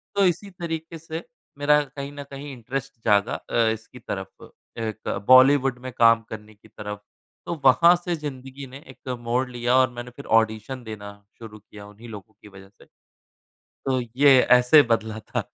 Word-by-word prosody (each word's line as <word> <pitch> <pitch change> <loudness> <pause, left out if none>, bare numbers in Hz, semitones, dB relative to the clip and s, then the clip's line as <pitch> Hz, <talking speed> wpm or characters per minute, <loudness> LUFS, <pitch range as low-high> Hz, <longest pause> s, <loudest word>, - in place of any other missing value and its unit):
तो 200 - +3
इसी 185 +3 0
तरीके 165 -2 -6
से 165 +1 -7 0.3
मेरा 150 +1 +3
कहीं 140 0 -8
न 145 0 -7
कहीं 140 +1 -8
इंटरेस्ट 135 +3 -6
जागा 105 -1 +3
अ, - - -8 0.2
इसकी 110 0 -12
तरफ, - - -8 0.3
एक 110 -1 -5 0.2
बॉलीवुड 130 0 +6
में 130 - -6
काम 115 -1 +5
करने 110 0 -9
की 105 - -21
तरफ। 105 0 -8 0.4
तो - - -3
वहाँ 170 +7 +6
से 175 0 -3
ज़िंदगी 135 -2 -8
ने 130 - -11
एक 130 0 -12
मोड़ 120 +2 -1
लिया 120 0 0
और 130 0 +4
मैंने 125 +3 -9 0.2
ऑडिशन 110 +3 -4
देना 105 -2 -8 0.3
शुरू 110 -2 -11
किया, 105 0 -14
उन्हीं 110 +3 -13
लोगों 105 0 -11
की - - -14
वजह 95 -1 -15
से। 100 - -22 0.8
तो 130 -1 -3 0.2
ये 140 -1 +6
ऐसे 125 +4 +6
बदला 110 -1 -1
था। - - -4
125 Hz, 170 wpm, -24 LUFS, 110-145 Hz, 0.8 s, बॉलीवुड